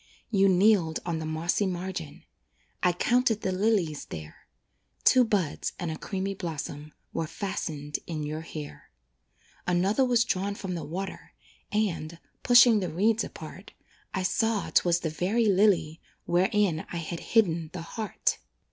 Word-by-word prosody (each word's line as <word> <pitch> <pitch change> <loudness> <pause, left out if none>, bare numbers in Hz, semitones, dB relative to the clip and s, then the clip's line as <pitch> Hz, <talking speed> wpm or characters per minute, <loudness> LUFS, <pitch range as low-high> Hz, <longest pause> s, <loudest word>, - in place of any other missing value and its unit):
You 195 -2 +4
kneeled 185 -4 +4
on 170 -2 -2
the 160 - -4
mossy 170 +5 0
margin 180 -4 -5 0.6
I 180 - +4
counted 235 +4 +2
the 190 - -1
lilies 185 -6 +1
there; 80 -1 -10 0.6
Two 255 - +6
buds 200 -10 -1
and 175 -3 -3
a - - -3
creamy 195 +3 -3
blossom 155 -4 -6 0.2
Were 165 - -2
fastened 155 -5 -4
in 155 -3 -3
your 155 +1 -4
hair. 155 -2 -9 0.8
Another 190 +8 +2
was 240 -2 +3
drawn 200 +2 -1
from 190 -2 -5
the 170 - -4
water, 190 +6 -6 0.4
And, 170 -6 -1 0.2
pushing 240 -3 +7
the 185 - -3
reeds 215 +7 +2
apart, - - -9 0.4
I 190 - -2
saw 220 +2 0
'twas 175 -1 +3
the 160 - -2
very 195 +9 +1
lily 190 -6 +3 0.2
Wherein 185 -1 +2
I 175 - -3
had 170 0 -4
hidden 170 -8 +1
the 175 -3 -6
heart. 215 +2 -2
180 Hz, 145 wpm, -28 LUFS, 160-205 Hz, 0.8 s, pushing